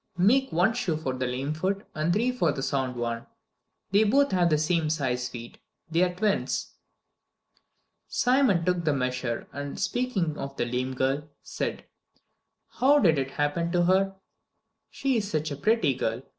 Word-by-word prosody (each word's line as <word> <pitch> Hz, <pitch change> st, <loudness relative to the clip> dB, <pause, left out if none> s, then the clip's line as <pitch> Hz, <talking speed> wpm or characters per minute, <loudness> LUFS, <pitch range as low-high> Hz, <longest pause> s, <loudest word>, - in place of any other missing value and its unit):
Make 255 Hz, +9 st, +3 dB
one 180 Hz, +7 st, +3 dB
shoe 180 Hz, -9 st, -1 dB
for 135 Hz, -4 st, -3 dB
the 130 Hz, 0 st, -2 dB
lame 130 Hz, +4 st, -2 dB
foot 190 Hz, +6 st, -2 dB
and 155 Hz, +2 st, 0 dB
three 235 Hz, +7 st, +2 dB
for 210 Hz, -11 st, +1 dB
the 135 Hz, -2 st, -4 dB
sound 130 Hz, -3 st, -1 dB
one. 115 Hz, -1 st, -3 dB, 0.6 s
They 205 Hz, +2 st, +5 dB
both 275 Hz, +7 st, +3 dB
have 175 Hz, -2 st, +3 dB
the 155 Hz, -, +3 dB
same 155 Hz, +1 st, +1 dB
size 125 Hz, -5 st, -1 dB
feet. 120 Hz, -1 st, -9 dB, 0.3 s
They 165 Hz, +2 st, +2 dB
are 180 Hz, -1 st, +3 dB
twins." 205 Hz, +2 st, -1 dB, 1.3 s
Simon 250 Hz, -10 st, +2 dB
took 180 Hz, -1 st, +1 dB
the 155 Hz, -2 st, +2 dB
measure 125 Hz, -2 st, -2 dB
and, 145 Hz, 0 st, -5 dB
speaking 200 Hz, -7 st, -1 dB
of 140 Hz, 0 st, -6 dB
the -, -, 0 dB
lame 125 Hz, +2 st, -2 dB
girl, 135 Hz, +3 st, -1 dB
said: -, -, -4 dB, 0.9 s
"How 280 Hz, +3 st, +6 dB
did 165 Hz, -, +4 dB
it 135 Hz, 0 st, -2 dB
happen 145 Hz, +4 st, 0 dB
to 175 Hz, -1 st, +3 dB
her? 190 Hz, +2 st, +2 dB, 0.7 s
She 270 Hz, -3 st, 0 dB
is 205 Hz, -2 st, -2 dB
such 155 Hz, -4 st, -1 dB
a -, -, -2 dB
pretty 195 Hz, -, +2 dB
girl. 115 Hz, -1 st, -2 dB
160 Hz, 170 wpm, -27 LUFS, 135-200 Hz, 1.3 s, How